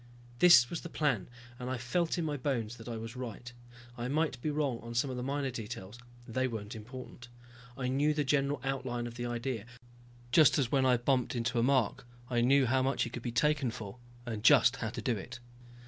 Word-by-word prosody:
This 150 Hz, -10 st, +8 dB
was 170 Hz, -, -5 dB
the 170 Hz, -, -7 dB
plan 140 Hz, -, 0 dB, 0.3 s
and 125 Hz, 0 st, -4 dB
I 130 Hz, -, -1 dB
felt 165 Hz, +9 st, -1 dB
in 170 Hz, -, -1 dB
my 150 Hz, -2 st, -1 dB
bones 120 Hz, -5 st, -2 dB
that 115 Hz, -, -11 dB
I 115 Hz, -, -4 dB
was 115 Hz, +2 st, -7 dB
right. 120 Hz, -1 st, -7 dB, 0.4 s
I 120 Hz, 0 st, -4 dB
might 150 Hz, -1 st, 0 dB
be 155 Hz, -, -1 dB
wrong 145 Hz, -5 st, -1 dB
on 115 Hz, 0 st, -8 dB
some 130 Hz, +3 st, +1 dB
of -, -, -4 dB
the 125 Hz, -, -4 dB
minor 135 Hz, +1 st, -2 dB
details, 110 Hz, -1 st, -7 dB, 0.3 s
they 130 Hz, +3 st, 0 dB
weren't 110 Hz, -3 st, -5 dB
important. 120 Hz, +2 st, -9 dB, 0.5 s
I 130 Hz, -2 st, -2 dB
knew 140 Hz, +4 st, +2 dB
the 150 Hz, -, +1 dB
general 140 Hz, 0 st, +1 dB
outline 130 Hz, -3 st, -2 dB
of 120 Hz, -, -6 dB
the 120 Hz, 0 st, -4 dB
idea, 120 Hz, -2 st, -3 dB, 0.6 s
just 155 Hz, +1 st, +6 dB
as 130 Hz, -5 st, 0 dB
when 135 Hz, -2 st, +3 dB
I 125 Hz, -1 st, +4 dB
bumped 125 Hz, +1 st, 0 dB
into 120 Hz, 0 st, 0 dB
a -, -, +3 dB
mark 125 Hz, -2 st, +1 dB, 0.2 s
I 120 Hz, -1 st, +2 dB
knew 135 Hz, +2 st, +5 dB
how 130 Hz, +2 st, +2 dB
much 135 Hz, +1 st, +1 dB
he 120 Hz, -, -4 dB
could 120 Hz, -, -6 dB
be 120 Hz, -, -3 dB
taken 150 Hz, +1 st, +2 dB
for, 110 Hz, 0 st, -8 dB, 0.3 s
and 110 Hz, -3 st, -5 dB
just 135 Hz, -1 st, +6 dB
how 115 Hz, -, -3 dB
to -, -, -6 dB
do 125 Hz, -3 st, +1 dB
it. 120 Hz, +5 st, -8 dB
125 Hz, 220 wpm, -32 LUFS, 120-140 Hz, 0.6 s, This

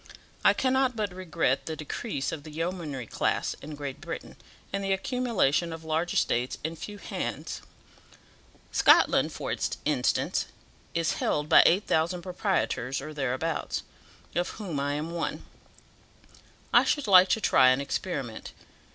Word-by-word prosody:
I -, -, +6 dB
cannot 260 Hz, -1 st, +2 dB
but 210 Hz, -4 st, -2 dB
regret 180 Hz, -3 st, -1 dB
the 160 Hz, -, -3 dB
decrease 155 Hz, -, -3 dB
of 155 Hz, -, -5 dB
the 155 Hz, -, -11 dB
yeomanry 160 Hz, -5 st, -4 dB
class -, -, -1 dB
in 150 Hz, +1 st, -7 dB
Great 140 Hz, -2 st, -6 dB
Britain, -, -, -7 dB, 0.4 s
and 195 Hz, 0 st, -1 dB
the 195 Hz, 0 st, +1 dB
accumulation 190 Hz, -, +1 dB
of 160 Hz, 0 st, -7 dB
large 160 Hz, +2 st, -1 dB
estates 125 Hz, +2 st, +1 dB
in 160 Hz, +2 st, -3 dB
few 205 Hz, +5 st, -8 dB
hands. -, -, -4 dB, 1.1 s
Scotland, -, -, +5 dB
for -, -, -3 dB, 0.3 s
instance, -, -, +1 dB, 0.5 s
is 165 Hz, -1 st, +1 dB
held 150 Hz, 0 st, -1 dB
by -, -, +9 dB
8000 175 Hz, -1 st, +1 dB
proprietors 180 Hz, -, -1 dB
or 155 Hz, +3 st, -7 dB
thereabouts, 145 Hz, +3 st, -2 dB, 0.5 s
of 175 Hz, +1 st, 0 dB
whom 180 Hz, -10 st, -4 dB
I 140 Hz, +1 st, -1 dB
am 150 Hz, +3 st, -3 dB
one. 170 Hz, -1 st, -3 dB, 1.3 s
I -, -, +7 dB
should 290 Hz, -, 0 dB
like 185 Hz, -2 st, +7 dB
to 220 Hz, -, +2 dB
try 130 Hz, -10 st, +5 dB
an 130 Hz, +1 st, +3 dB
experiment. 140 Hz, -, -4 dB
165 Hz, 140 wpm, -28 LUFS, 145-195 Hz, 1.3 s, by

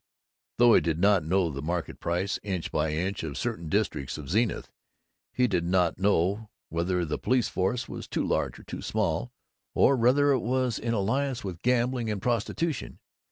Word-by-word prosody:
Though 120 Hz, -1 st, +6 dB
he -, -, +6 dB
did 80 Hz, -2 st, -1 dB
know 90 Hz, -2 st, +3 dB
the 70 Hz, -1 st, -5 dB
market 85 Hz, +2 st, -3 dB
price, 90 Hz, +4 st, -1 dB
inch 95 Hz, -5 st, -3 dB
by 75 Hz, 0 st, 0 dB
inch, 90 Hz, +6 st, -2 dB
of 75 Hz, -3 st, -5 dB
certain 85 Hz, -10 st, -3 dB
districts 70 Hz, -2 st, -1 dB
of 75 Hz, -1 st, -7 dB
Zenith, 110 Hz, +4 st, 0 dB, 0.6 s
he 125 Hz, 0 st, +2 dB
did 95 Hz, -6 st, 0 dB
not 90 Hz, -1 st, +1 dB
know 100 Hz, +2 st, +1 dB, 0.2 s
whether 85 Hz, +2 st, 0 dB
the 75 Hz, -1 st, -3 dB
police 125 Hz, -2 st, +1 dB
force 110 Hz, +6 st, -1 dB
was -, -, -7 dB
too -, -, -1 dB
large -, -, -1 dB
or -, -, -13 dB
too -, -, -7 dB
small, 60 Hz, -, -1 dB, 0.4 s
or 140 Hz, -, +5 dB
whether 135 Hz, +4 st, +4 dB
it 135 Hz, -, +3 dB
was 125 Hz, -1 st, 0 dB
in 115 Hz, 0 st, -1 dB
alliance 125 Hz, +5 st, 0 dB
with 90 Hz, -4 st, -6 dB
gambling 125 Hz, -1 st, +1 dB
and 105 Hz, -2 st, -2 dB
prostitution. 125 Hz, -, -2 dB
100 Hz, 175 wpm, -27 LUFS, 85-120 Hz, 0.6 s, Though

